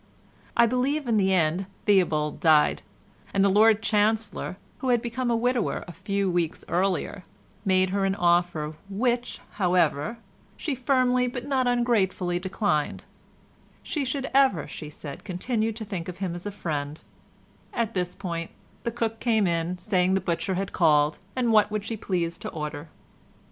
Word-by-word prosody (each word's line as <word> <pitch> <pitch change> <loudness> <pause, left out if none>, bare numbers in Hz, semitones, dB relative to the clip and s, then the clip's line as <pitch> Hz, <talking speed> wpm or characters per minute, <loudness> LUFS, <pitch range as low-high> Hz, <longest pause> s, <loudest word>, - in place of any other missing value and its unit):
I 235 - +7
believe 260 +5 0
in 230 -3 +2
the 190 -2 +3
end 180 +1 +1 0.2
Theobald 160 -7 +2
died, 155 -2 +4 0.5
and 195 0 +4
the - - +5
Lord 220 +2 +5
Chancellor 215 -2 0 0.2
(who 260 - -2
had 240 -1 +4
become 240 +2 -2
a 235 - +2
widower 245 0 0
a - - -7
few 200 +3 -2
weeks 175 -3 -1
earlier) 185 +1 0 0.4
made 185 -1 +3
her 200 0 0
an 195 0 +1
offer, 175 -4 +1 0.2
which, 240 +4 -1 0.2
however, 180 +3 +2 0.4
she 305 - -2
firmly 255 -1 +2
but 245 0 -5
not 260 -3 +1
ungratefully 205 -7 +1
declined; 185 -5 -1 0.8
she 300 - -2
should 270 +1 -2
ever, 265 - +3
she 150 - -8
said, 145 -2 -9
continue 220 +5 -1
to 220 0 -6
think 185 -4 -5
of 180 - -7
him 185 -3 -3
as 175 +3 -6
a - - -3
friend—at 165 - -6
this 180 -1 -2
point 170 -3 -4 0.3
the - - 0
cook 230 -1 -2
came 220 -4 +2
in, 170 +1 -1
saying 185 0 +1
the - - +3
butcher 185 +1 -1
had 195 +1 -2
called, 150 -3 +3 0.2
and 245 -3 +1
what 210 -1 +5
would 210 -1 -3
she 225 - -3
please 175 -5 -2
to 215 0 -5
order. 150 0 -6
195 Hz, 160 wpm, -26 LUFS, 175-235 Hz, 0.8 s, I